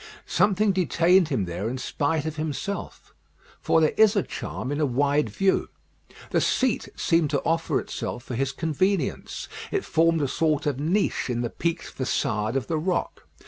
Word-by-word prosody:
Something 205 0 +2
detained 180 -1 +3
him 130 - 0
there 90 +5 -3
in 130 - -3
spite 145 +4 -1
of 160 -1 -3
himself, 155 +6 -5 0.5
for - - +3
there 155 -1 +3
is 220 0 +6
a 200 - +2
charm 130 - -5
in 145 - -2
a - - +4
wide 140 +1 +1
view. 190 - +1 0.6
The - - +2
seat 255 -3 +1
seemed 165 -3 +2
to 140 -2 0
offer 165 +1 +1
itself 120 - -5
for 130 - -7
his 135 +3 0
convenience; 165 +7 -1 0.2
it 400 - -1
formed 165 -1 +2
a - - +1
sort 155 +1 0
of 140 -3 -1
niche 170 0 0
in 120 -1 -1
the 120 - -2
peaked 170 +1 -3
façade 110 -3 0
of 135 - 0
the 160 -2 -1
rock. 180 +2 -2
155 Hz, 175 wpm, -25 LUFS, 135-180 Hz, 0.6 s, is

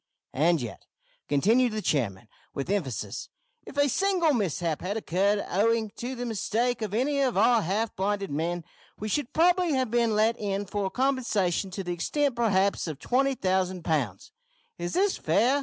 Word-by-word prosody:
"And 165 +4 +3
yet," 115 -6 -7 0.4
continued 220 - +3
the 215 - -2
chairman, 115 -7 -1 0.3
with 140 +7 -3
emphasis, 145 - -3 0.4
"if 280 - -10
a 285 0 +4
single 360 +1 +2
mishap 170 - -1
had 195 +4 -2
occurred 200 +1 +1
owing 220 +3 +1
to 250 +2 -4
the 245 0 -4
mistake 235 +2 -1
of 210 -2 -3
any 280 +4 +1
of 255 -6 +1
our 230 +2 +5
half 210 +5 -1
blinded 200 -1 -1
men, 170 +4 -2 0.3
we 215 - -5
should 245 +4 -1
probably 350 0 +3
have 260 -4 0
been 235 -2 +2
let 220 +2 +2
in 200 -1 -2
for 200 0 -2
compensation 220 -8 0
to 190 +1 -5
the 175 -1 -3
extent 280 - 0
perhaps 200 -6 +1
of 155 -3 -4
20,000 190 - 0
pounds! 130 - -1 0.5
Is 175 0 -3
this 390 +1 +2
fair? 235 - +2
210 Hz, 165 wpm, -27 LUFS, 180-245 Hz, 0.5 s, our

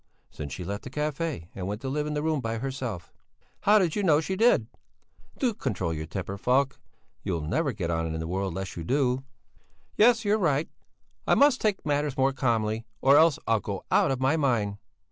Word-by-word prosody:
"Since 70 -3 -7
she 90 - -6
left 100 +3 -4
the - - -7
café 150 - -3
and 95 -1 -5
went 105 +1 -3
to 135 - -5
live 150 +3 -1
in 150 0 -2
a 150 - -1
room 155 -3 0
by 115 -1 -2
herself." 125 - -5 0.5
"How 210 +1 +5
do 195 - +4
you 175 +5 -2
know 160 -6 +4
she 190 +4 -2
did?" 220 - +4 0.7
"Do 250 -4 +1
control 95 - -2
your 80 0 -5
temper, 95 +2 -5
Falk. 135 +4 +1 0.4
You'll 85 -4 -2
never 140 - 0
get 90 -7 -3
on 80 -1 -1
in 80 - -3
the 80 - -3
world 95 +1 -2
unless 95 +1 -5
you 85 - -5
do." 130 - +1 0.7
"Yes, 230 +1 +5
you're 210 +2 +2
right. 150 -5 +1 0.6
I - - +5
must 280 -2 +4
take 210 -6 0
matters 145 -1 0
more 135 +1 +2
calmly, 115 -4 0 0.2
or 135 +1 +5
else 160 0 +5
I'll 115 -1 +2
go 100 -1 -5
out - - +4
of 135 -2 -1
my 135 +5 +2
mind! 110 -9 0
130 Hz, 205 wpm, -27 LUFS, 100-155 Hz, 0.7 s, How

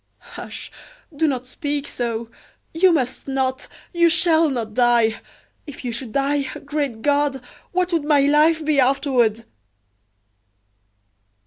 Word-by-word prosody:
"Hush! - - -8 0.4
do 320 +2 +2
not 260 -3 -2
speak 285 +2 -4
so. 230 -1 -4 0.4
You 360 +3 +4
must 260 -6 -1
not, 265 -1 -2 0.3
you 340 -1 +4
shall 330 -2 +3
not 230 -5 -4
die! 235 -2 +3 0.5
If 275 -2 -9
you 245 - -2
should 235 0 -5
die 280 +3 +1 0.2
great 285 -6 -3
God! 285 -1 +1 0.3
what 360 0 0
would 330 -3 +1
my 295 -2 +4
life 305 +3 +3
be 300 -2 +2
afterward?" 250 -4 +2
275 Hz, 125 wpm, -21 LUFS, 245-305 Hz, 0.5 s, You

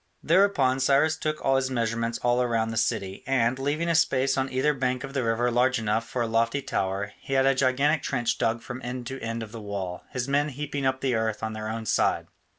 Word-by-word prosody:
Thereupon 160 -7 +3
Cyrus 140 +4 +3
took 155 -1 -3
his 135 -1 +2
measurements 115 -1 -1
all 120 +1 +3
round 115 -1 0
the - - -5
city, 100 -4 -1
and, 130 -1 +1
leaving 150 +5 -1
a 170 - +2
space 135 -4 +2
on 135 0 0
either 130 +4 +2
bank 130 -1 -1
of 135 0 -7
the 135 -2 0
river 115 +2 +1
large 125 +2 +3
enough 110 +1 -1
for 125 - -1
a - - -1
lofty 115 +4 +1
tower, 100 -4 -2
he 135 - -6
had 135 0 +4
a 135 - +5
gigantic 140 +3 +2
trench 120 -4 -1
dug 115 0 0
from 125 0 -7
end 125 0 -5
to 135 +2 -5
end 115 0 -3
of 110 - -10
the 115 -1 -8
wall, 100 -3 -5
his 125 0 -3
men 145 +2 +1
heaping 140 0 -3
up 130 0 -1
the 130 -2 +1
earth 110 -1 -1
on 110 0 -2
their 110 0 -5
own 110 0 -4
side. - - +1
125 Hz, 230 wpm, -26 LUFS, 115-135 Hz, -, a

